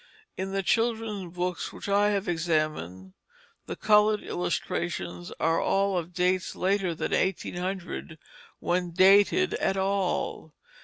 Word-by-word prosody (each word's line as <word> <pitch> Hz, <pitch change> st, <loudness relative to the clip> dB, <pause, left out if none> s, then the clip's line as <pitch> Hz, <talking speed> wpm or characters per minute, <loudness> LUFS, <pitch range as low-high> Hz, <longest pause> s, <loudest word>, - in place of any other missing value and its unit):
In 190 Hz, +1 st, -4 dB
the 195 Hz, 0 st, -1 dB
children's 220 Hz, -5 st, 0 dB
books 180 Hz, 0 st, -3 dB
which -, -, -9 dB
I 205 Hz, +1 st, +3 dB
have 200 Hz, 0 st, -1 dB
examined, 155 Hz, -, -2 dB, 0.5 s
the -, -, -4 dB
colored 210 Hz, 0 st, +3 dB
illustrations 90 Hz, -, -3 dB
are 165 Hz, 0 st, +2 dB
all 195 Hz, 0 st, +1 dB
of 175 Hz, -1 st, -3 dB
dates 180 Hz, +1 st, 0 dB
later 190 Hz, -2 st, 0 dB
than -, -, -3 dB
1800 180 Hz, -2 st, -2 dB, 0.4 s
(when 175 Hz, 0 st, -1 dB
dated 200 Hz, -, +5 dB
at 195 Hz, -, 0 dB
all). 195 Hz, -1 st, -1 dB
185 Hz, 120 wpm, -27 LUFS, 170-200 Hz, 0.5 s, dated